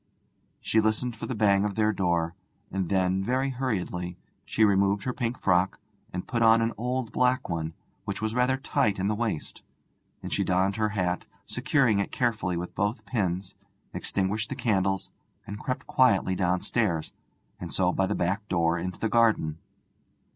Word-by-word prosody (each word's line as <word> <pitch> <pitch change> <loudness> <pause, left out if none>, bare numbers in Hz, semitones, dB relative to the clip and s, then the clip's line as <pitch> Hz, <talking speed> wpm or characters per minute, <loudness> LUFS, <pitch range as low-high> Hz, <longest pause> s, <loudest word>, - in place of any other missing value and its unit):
She 110 - +2
listened 110 +3 0
for - - -6
the 125 - -3
bang 100 -2 +3
of 105 -2 -1
their 110 -1 +2
door, 85 -3 0 0.4
and 95 -2 -2
then, 95 0 +1
very 130 +5 0
hurriedly, 90 -9 -3 0.3
she 110 - +3
removed 100 0 +3
her 125 - -2
pink 120 -1 -2
frock 90 0 +2 0.3
and 90 - -4
put 120 -2 -1
on 115 0 +6
an 115 0 0
old 125 +1 -2
black 125 0 +2
one, 80 -1 -3 0.3
which 100 -2 -3
was 110 0 -2
rather 125 +2 +2
tight 105 -6 +1
in 95 +2 0
the - - +1
waist. 105 -7 -3 0.6
And - - -4
she - - +1
donned 95 +2 +1
her 110 -1 +1
hat, 90 -4 -1 0.2
securing 125 -2 +2
it 100 - -1
carefully 110 -8 0
with 90 +1 -5
both 105 +5 -1
pins, 95 -4 -2 0.4
extinguished 105 +3 -1
the 135 - -3
candles, 95 -6 0 0.3
and 105 +1 -7
crept 130 +2 -3
quietly 100 -7 +3
downstairs, 90 -1 0 0.5
and - - -6
so 90 -1 +2
by 95 +1 +1
the 105 - -1
back 100 +4 -1
door 85 -2 +1
into 90 +1 -4
the 110 - 0
garden. 110 -9 +2
100 Hz, 170 wpm, -27 LUFS, 90-115 Hz, 0.6 s, on